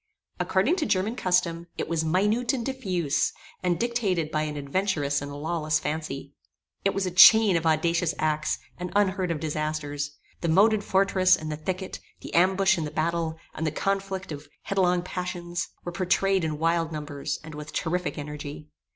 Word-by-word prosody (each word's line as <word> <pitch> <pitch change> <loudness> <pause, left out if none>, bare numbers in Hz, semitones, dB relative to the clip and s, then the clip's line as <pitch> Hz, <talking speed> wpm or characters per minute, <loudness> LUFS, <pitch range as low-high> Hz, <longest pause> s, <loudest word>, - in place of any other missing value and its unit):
According 220 - +2
to 305 - 0
German 200 +5 +1
custom, 175 -4 +1
it - - -2
was 165 -1 0
minute 210 +10 +2
and 240 -4 -2
diffuse, 185 - 0 0.3
and 180 -2 0
dictated 205 -10 0
by 155 - 0
an 150 -1 -3
adventurous 145 -1 0
and 145 0 -6
lawless 155 +1 -1
fancy. 150 -3 -4 0.5
It 195 - +1
was 195 -1 0
a 185 - -2
chain 200 +3 +8
of 165 -1 +1
audacious 165 +1 +2
acts, 155 0 0 0.2
and 180 0 -4
unheard 190 -2 +2
of 165 -2 -1
disasters. 150 -1 -3 0.2
The 170 - -2
moated 205 +5 +4
fortress, 190 -1 +4
and 155 0 -5
the - - -2
thicket; 185 +5 -4 0.2
the - - -9
ambush 190 +1 +4
and 155 - -2
the - - -5
battle; 165 +1 -1 0.2
and 160 - -2
the - - 0
conflict 195 +1 -2
of 145 0 -7 0.2
headlong 180 -2 +1
passions, 175 -1 -4 0.2
were 175 - -4
pourtrayed 190 +1 +1
in 155 -2 -1
wild 165 0 +1
numbers, 150 -2 -4
and 155 0 -9
with 150 0 -8
terrific 180 +1 -2
energy. 150 0 -7
170 Hz, 170 wpm, -26 LUFS, 155-190 Hz, 0.5 s, chain